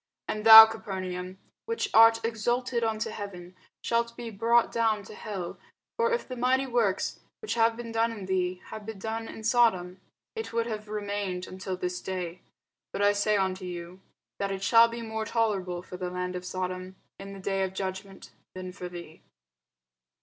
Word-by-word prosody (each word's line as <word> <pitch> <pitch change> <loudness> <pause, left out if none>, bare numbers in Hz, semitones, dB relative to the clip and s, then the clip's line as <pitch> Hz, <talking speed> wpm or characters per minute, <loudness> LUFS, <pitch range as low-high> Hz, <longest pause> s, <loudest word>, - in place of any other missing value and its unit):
And 215 0 -3
thou, 220 0 +14
Capernaum, 185 -4 -5 0.3
which 460 0 -2
art 225 0 +6
exalted 240 +2 -1
unto 220 0 -1
heaven, 185 -4 -8 0.3
shalt 235 0 0
be 235 -1 -6
brought 230 +3 +2
down 220 -3 +1
to 200 - -11
hell: 195 -5 -6 0.4
for 465 0 +1
if 475 - -1
the 255 - -6
mighty 255 +2 +2
works, 235 -7 0 0.2
which 435 - -3
have 230 0 +2
been 235 -1 -6
done 225 +1 +1
in 210 -4 -7
thee, 185 -1 -1
had 215 - -7
been 220 0 -7
done 225 +3 -4
in 220 - -9
Sodom, 195 -6 +2 0.3
it 445 0 -5
would 230 0 +1
have 215 -2 -5
remained 205 -3 -3
until 185 0 -6
this 180 0 -3
day. 180 -2 -5 0.5
But 200 - -2
I 205 0 +5
say 205 +1 +2
unto 190 -1 -1
you, 175 +1 -7 0.4
That 200 0 -1
it 195 0 -4
shall 230 +2 +6
be 235 0 -6
more 220 -1 -3
tolerable 195 -6 -1
for 180 - -9
the 180 -1 -3
land 180 0 -4
of 180 0 -5
Sodom 185 0 -4 0.2
in 195 0 -8
the 195 - -9
day 195 0 -1
of 190 0 -3
judgment, 190 0 -6 0.2
than 185 0 -6
for 180 -1 -7
thee. 170 -2 -10
205 Hz, 180 wpm, -28 LUFS, 185-230 Hz, 0.5 s, thou